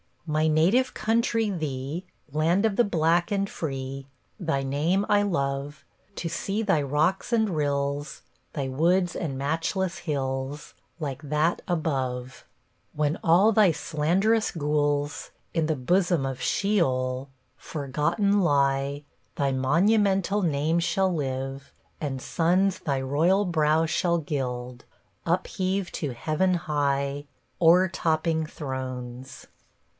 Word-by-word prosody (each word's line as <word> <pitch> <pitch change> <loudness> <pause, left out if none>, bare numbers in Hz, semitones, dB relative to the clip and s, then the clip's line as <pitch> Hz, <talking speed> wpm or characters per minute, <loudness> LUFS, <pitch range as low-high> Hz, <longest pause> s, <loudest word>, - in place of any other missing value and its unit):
My 155 0 +1
native 180 +12 +3
country, 225 0 +1
thee, 155 0 -4 0.3
Land 165 +7 +2
of 210 -2 0
the 240 - +5
black 170 -1 +1
and 200 -1 +1
free, 135 -2 -5 0.3
Thy 160 -7 -1
name 155 +9 +1
I 205 0 +4
love; 140 -4 -2 0.3
To 170 - -3
see 195 +6 -2
thy 195 -8 +2
rocks 155 - 0
and 220 -2 +3
rills, 145 -2 -2 0.3
Thy 140 -3 -2
woods 175 +6 +2
and 145 -6 -3
matchless 165 +6 -1
hills, 135 -2 -3 0.3
Like 140 -2 -4
that 150 +4 0
above. 130 -7 -2 0.5
When 150 +1 0
all 185 +6 +5
thy 210 -4 +5
slanderous 190 +11 +1
ghouls, 145 -2 -1 0.2
In 165 -2 +1
the 160 - +1
bosom 175 +2 +1
of 135 -1 -4
sheol, 130 -10 0 0.3
Forgotten 165 +8 0
lie, 140 -3 +1 0.3
Thy 140 -1 +1
monumental 195 +8 +2
name 155 +1 +1
shall 190 +2 +1
live, 135 -2 -4 0.3
And 135 -4 -3
suns 180 +6 +1
thy 140 -3 -1
royal 165 +9 +2
brow 160 -2 +2
shall 170 +2 +1
gild, 125 -5 -4 0.4
Upheaved 185 +2 -1
to 145 -5 -3
heaven 155 +9 0
high, 145 -3 -1 0.4
O'ertopping 165 -2 +3
thrones. 130 -3 -6
155 Hz, 115 wpm, -26 LUFS, 140-180 Hz, 0.5 s, the